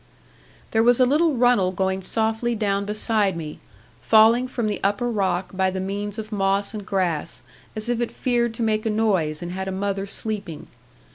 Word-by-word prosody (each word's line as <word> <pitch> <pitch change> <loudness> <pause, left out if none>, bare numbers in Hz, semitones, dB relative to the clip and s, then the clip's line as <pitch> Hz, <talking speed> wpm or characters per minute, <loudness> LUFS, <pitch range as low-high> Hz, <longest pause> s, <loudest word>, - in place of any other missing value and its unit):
There 225 - +3
was 240 +2 +4
a 255 - +6
little 300 +3 +2
runnel 245 -7 +3
going 190 +1 -1
softly 225 +4 -1
down 200 -2 0
beside 210 -2 0
me, 155 -2 -7 0.4
falling 225 - +5
from 245 -3 -3
the 210 -1 -1
upper 205 +5 0
rock 190 -3 -1
by 190 0 +2
the 190 0 -4
means 200 +2 -4
of 215 0 -6
moss 195 0 0
and 210 -1 -5
grass, 185 -5 -2 0.3
as 215 +1 -2
if 240 0 0
it 240 - -2
feared 235 -2 0
to 230 - -2
make 215 0 0
a - - +1
noise, 190 -8 0
and 175 - -5
had 190 +1 -4
a - - -2
mother 195 +1 -2
sleeping. 200 -6 -4
210 Hz, 190 wpm, -23 LUFS, 190-225 Hz, 0.4 s, a